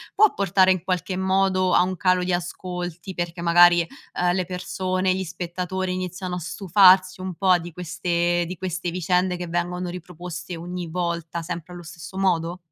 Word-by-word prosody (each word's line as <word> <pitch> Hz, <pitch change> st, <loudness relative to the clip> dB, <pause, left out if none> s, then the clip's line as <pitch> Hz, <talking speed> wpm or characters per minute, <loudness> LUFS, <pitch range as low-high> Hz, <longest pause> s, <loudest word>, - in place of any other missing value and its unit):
può 425 Hz, 0 st, +5 dB
portare 190 Hz, -1 st, +3 dB
in 185 Hz, -3 st, 0 dB
qualche 185 Hz, 0 st, -2 dB
modo 190 Hz, -1 st, +2 dB
a -, -, +6 dB
un 185 Hz, +1 st, -2 dB
calo 185 Hz, 0 st, +2 dB
di 180 Hz, -, -1 dB
ascolti, 180 Hz, 0 st, -4 dB
perché 175 Hz, -1 st, -4 dB
magari, 175 Hz, 0 st, +6 dB, 0.4 s
uhm, 175 Hz, 0 st, +3 dB
le 185 Hz, -1 st, 0 dB
persone, 185 Hz, +1 st, -1 dB
gli 190 Hz, -, -2 dB
spettatori 180 Hz, +2 st, -3 dB
iniziano 185 Hz, 0 st, -4 dB
a -, -, -3 dB
stufarsi 185 Hz, +1 st, +4 dB
un 185 Hz, 0 st, -4 dB
po' 185 Hz, 0 st, +4 dB
di 175 Hz, 0 st, -8 dB
queste 175 Hz, 0 st, 0 dB
di 180 Hz, -, -5 dB
queste 180 Hz, 0 st, -3 dB
vicende 180 Hz, +1 st, +1 dB
che 175 Hz, -, -5 dB
vengono 175 Hz, +1 st, -2 dB
riproposte 175 Hz, -1 st, -7 dB
ogni 175 Hz, +1 st, -6 dB
volta 170 Hz, -1 st, -3 dB
sempre 170 Hz, +1 st, -6 dB
allo 175 Hz, -, -9 dB
stesso 170 Hz, +3 st, -10 dB
modo? 175 Hz, -2 st, 0 dB
180 Hz, 170 wpm, -24 LUFS, 175-185 Hz, 0.4 s, a